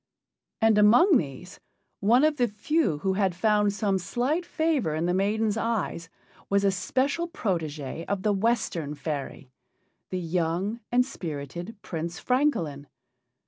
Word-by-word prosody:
And 220 -1 +5
among 260 - +6
these, 165 - -6 0.4
one 235 +7 +4
of 305 -1 +3
the 245 -2 +3
few 220 - 0
who 190 +6 0
had 190 -2 +1
found 210 +1 +2
some 200 -2 0
slight 270 - -1
favor 310 - 0
in 160 +2 -1
the 175 - +1
maiden's 210 +3 +1
eyes 225 -7 -2 0.4
was 200 0 +2
a 200 - +4
special 265 - 0
protégé 165 - -3
of 200 -2 -2
the 210 - +2
Western 190 -8 0
fairy 145 -3 -5 0.6
the 185 - -2
young 180 +5 -1
and 250 +1 +4
spirited 175 - -6
Prince 170 0 -4
Francolin. 170 - 0
200 Hz, 140 wpm, -27 LUFS, 170-240 Hz, 0.6 s, among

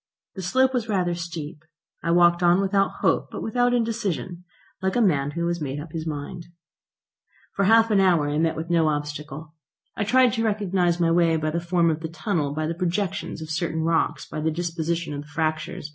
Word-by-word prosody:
The 190 - -6
slope 260 +8 +2
was 240 -3 -1
rather 180 -4 +1
steep. 170 -3 -6 0.4
I - - -3
walked 175 0 +4
on 175 +1 +4
without 195 0 0
hope - - +1
but - - -6
without 245 +2 +1
indecision, 210 -7 -2 0.4
like 190 0 -1
a - - +3
man 150 -11 +2
who 170 - 0
has 170 -1 -2
made 140 -1 -3
up 150 +1 -8
his 165 0 -5
mind. 155 +3 -6 1.1
For 200 - +1
half 225 +2 +5
an 205 - +4
hour 175 -6 +3
I 145 +1 -1
met 160 0 +1
with 165 +2 -5
no 165 -2 +3
obstacle. 150 0 -4 0.4
I 215 - -1
tried 250 +2 +4
to 225 - -1
recognise 190 -5 +1
my 165 -1 +2
way 165 -1 +3
by 155 0 -1
the 170 - -1
form 170 -1 +2
of 155 - -3
the 160 0 -5
tunnel, 160 -3 -2
by 155 +2 -2
the 165 - -1
projections 180 -1 -2
of 155 - -7
certain 160 0 -1
rocks, 165 0 0
by 155 - -5
the 160 - +1
disposition 165 -1 -2
of 145 - -4
the 145 - -13
fractures. 155 0 -3
170 Hz, 205 wpm, -24 LUFS, 155-195 Hz, 1.1 s, half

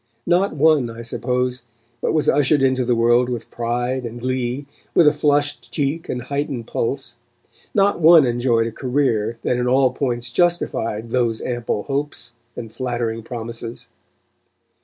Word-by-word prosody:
Not 180 0 +2
one, 150 -4 +3
I 115 +1 -8
suppose, 125 +1 -1 0.4
but - - 0
was 155 -2 +1
ushered 145 0 +3
into 130 -1 +2
the 120 0 +1
world 120 +2 +3
with 120 -2 -5
pride 120 +2 -2
and 120 0 -6
glee, 130 +2 -2 0.3
with 170 - +6
a 150 - +6
flushed 145 -1 0
cheek 150 +3 -2
and 125 -1 -3
heightened 140 -2 -3
pulse; 120 +1 -3 0.6
not 200 -2 +3
one 165 -2 +7
enjoyed 120 -1 +1
a 115 - -3
career 120 -3 0
that 125 - +1
in 125 0 0
all 130 0 +4
points 120 -3 -2
justified 115 -9 0
those 120 -3 +1
ample 120 -4 -2
hopes 140 -3 -3 0.2
and 115 -2 -7
flattering 120 -3 -2
promises. 115 0 -7
125 Hz, 150 wpm, -21 LUFS, 120-145 Hz, 0.6 s, one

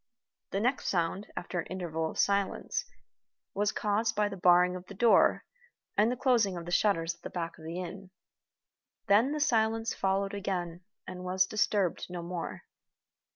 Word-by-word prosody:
The 195 - -1
next 250 +5 0
sound, 180 +3 0
after 180 - -3
an - - -4
interval 165 -3 -3
of - - -9
silence, 200 -1 0 0.7
was 205 +1 +1
caused 215 +2 0
by 210 0 +2
the 200 - -6
barring 180 0 +4
of 180 0 -8
the 200 - -10
door 235 +4 +4 0.5
and 215 +3 +3
the - - -1
closing 230 -8 +2
of 170 - -6
the 175 - -6
shutters 170 -4 +2
at - - -24
the - - -6
back 170 -2 -5
of 160 - -12
the 165 +2 -5
inn. 185 +1 -7 1.0
Then 215 +7 +4
the 305 - -2
silence 225 -4 +1
followed 195 +1 0
again, 180 -4 -3 0.2
and 180 -1 -7
was 185 +1 +2
disturbed 205 -3 0
no 175 -1 -5
more. 175 0 -5
190 Hz, 170 wpm, -30 LUFS, 175-210 Hz, 1.0 s, barring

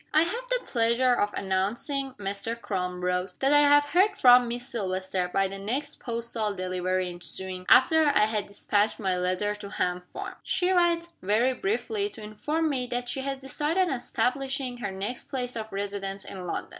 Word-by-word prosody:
"I 310 - +7
have 470 +9 -4
the - - 0
pleasure 235 +1 +2
of 205 -3 +1
announcing" 230 +9 -1
(Mr. 205 +3 -4
Crum 180 -4 -3
wrote) 180 0 -1
"that 270 +2 +3
I 290 - +7
have 290 0 +6
heard 365 +8 +3
from 245 -1 +7
Miss 240 +1 -4
Silvester, 190 -5 -2
by 195 +1 +2
the 195 +1 -7
next 265 +9 -3
postal 230 -3 -3
delivery 185 0 -1
ensuing, 185 +1 -5
after 320 +5 +6
I 280 -8 +4
had 215 -2 -2
dispatched 205 +1 0
my 190 -3 0
letter 185 +3 0
to 210 -1 -8
Ham 180 -2 -1
Farm. - - -7
She 375 -1 +1
writes, 345 -2 +2
very 220 +7 +2
briefly, 405 - -1
to 225 - -10
inform 300 +10 -1
me 260 -4 -1
that 245 0 -3
she 265 - -1
has 275 0 -3
decided 300 +7 0
on - - 0
establishing 265 +1 -1
her 240 -4 -3
next 200 +6 -4
place 250 -2 -4
of 220 -1 -5
residence 195 0 -4
in 185 -2 -7
London. - - -4
235 Hz, 180 wpm, -27 LUFS, 195-275 Hz, -, I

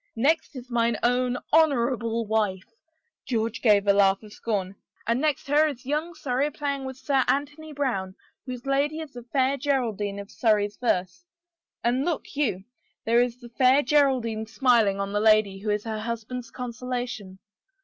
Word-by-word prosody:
Next 290 +6 +1
is 255 -1 -9
mine 235 -1 +1
own 245 +1 +2 0.2
honorable 240 -7 +2
wife," 205 -3 0 0.6
George 230 -2 -1
gave 210 -4 +4
a 200 - +5
laugh 195 0 +3
of 210 -1 -12
scorn, 195 -4 -2 0.3
"and 235 +3 +1
next 300 -3 0
her 295 +2 +4
is 265 -5 -6
young 305 +5 -2
Surrey 280 -1 0
playing 280 -2 -3
with 260 -1 -6
Sir 270 -1 +1
Anthony 295 +3 -1
Brown, 235 -10 -2 0.3
whose 250 -1 -6
lady 285 +3 +1
is 315 -3 -8
the 245 - -8
fair 260 +3 0
Geraldine 235 -8 -1
of 200 0 -8
Surrey's 210 -3 +1
verse, 185 - -1 0.6
and 245 +3 +1
look 325 -2 -3
you, 215 -11 0 0.4
there 235 +2 +4
is 245 -1 -1
the 240 -1 -12
fair 260 +4 +4
Geraldine 250 -6 +2
smiling 225 -4 +3
on 200 0 -3
the 205 - +1
lady 215 -3 +4
who 210 +2 -4
is 210 0 0
her 220 -1 -4
husband's 235 +2 -5
consolation 245 -5 -5
245 Hz, 165 wpm, -26 LUFS, 215-275 Hz, 0.6 s, a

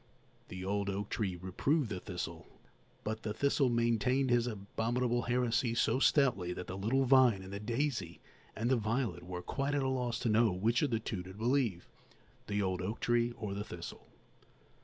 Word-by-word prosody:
The 95 0 -6
old 100 0 0
oak 100 +1 -3
tree 95 -5 -1
reproved 110 - 0
the 95 - -3
thistle; 90 -3 -6 0.6
but 110 +1 -3
the 105 -1 -4
thistle 140 +1 +2
maintained 120 +3 +2
his 120 0 +3
abominable 120 +3 -1
heresy 120 0 +1
so 125 - +2
stoutly 125 - +3
that 90 - -6
the 95 - -6
little 115 +8 +1
vine 125 -7 +5
and 95 +1 -9
the 100 - -4
daisy 115 - -2 0.4
and 115 +3 0
the 130 - +4
violet 110 -5 -1
were 90 0 -6
quite 140 +8 -1
at 140 - +1
a - - +1
loss 125 -2 -1
to 125 - 0
know 110 0 +4
which 110 +7 +1
of 150 - +2
the 115 -2 0
two 105 -4 -4
to 95 +1 -10
believe, 115 -5 0 0.6
the 105 -1 0
old 95 -1 -1
oak 105 +5 -3
tree 120 0 +2
or 105 -4 -5
the 100 +1 -3
thistle. 85 -4 -9
115 Hz, 185 wpm, -33 LUFS, 95-125 Hz, 0.6 s, vine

